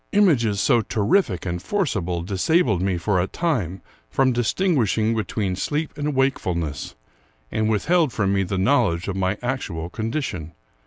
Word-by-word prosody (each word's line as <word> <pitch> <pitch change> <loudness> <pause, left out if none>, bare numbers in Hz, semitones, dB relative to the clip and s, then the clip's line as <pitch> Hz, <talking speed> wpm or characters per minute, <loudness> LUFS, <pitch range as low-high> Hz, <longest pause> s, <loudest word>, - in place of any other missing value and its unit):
Images 135 - +3
so 120 +2 +3
terrific 110 - +1
and 90 -1 -3
forcible 95 - -1
disabled 105 - +1
me 95 -1 0
for 90 +2 +1
a 90 - -1
time 100 - -2 0.3
from 135 -1 +2
distinguishing 120 - +1
between 105 -3 -2
sleep 150 - -2
and 150 -1 -2
wake 135 0 +2
fulness, 85 -5 -3 0.6
and 110 0 0
withheld 155 - +2
from 100 -4 0
me 100 - +2
the 95 +1 -2
knowledge 95 -5 +2
of 100 - -2
my 95 +1 0
actual 90 -10 -3
condition. 110 - -3
110 Hz, 150 wpm, -23 LUFS, 95-135 Hz, 0.6 s, Images